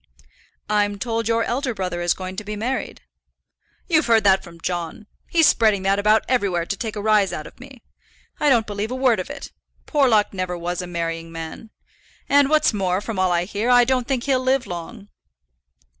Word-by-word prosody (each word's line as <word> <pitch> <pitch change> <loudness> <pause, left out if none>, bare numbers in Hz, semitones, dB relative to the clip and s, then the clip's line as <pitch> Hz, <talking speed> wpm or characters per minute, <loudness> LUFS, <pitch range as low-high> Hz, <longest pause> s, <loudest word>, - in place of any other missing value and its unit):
"I'm 205 -1 +1
told 230 0 -2
your 230 0 +2
elder 250 0 -2
brother 180 -3 -3
is 175 0 +1
going 185 0 -6
to 215 - -4
be 210 +1 -5
married." 245 +6 -3 0.9
"You've 325 -3 +2
heard 225 -2 +4
that 190 -1 +4
from 170 -2 -13
John. 175 +4 -4 0.2
He's 330 -2 +4
spreading 215 -7 +3
that 195 +1 +2
about 215 +2 +3
everywhere 195 -9 0
to 200 - -3
take 220 +2 -5
a 205 - -4
rise 210 -3 +3
out 155 - -5
of - - -14
me. 260 -1 -14 0.6
I 295 - +3
don't 235 -5 +3
believe 205 +1 -4
a 255 - -3
word 255 -4 +2
of 185 - -5
it. - - -8 0.3
Porlock 245 -10 +2
never 185 -2 -3
was 175 +1 -3
a 180 - -7
marrying 165 -1 -4
man; 165 +7 -8 0.6
and, 285 -1 +4
what's 310 -5 +3
more, 190 -2 0
from 210 -1 -5
all 185 -1 +2
I 175 0 +1
hear, 210 +5 -2
I 245 0 +6
don't 250 -1 0
think 260 -3 -1
he'll 270 -2 +1
live 260 0 +1
long." 200 +3 -8
210 Hz, 200 wpm, -22 LUFS, 185-245 Hz, 0.9 s, I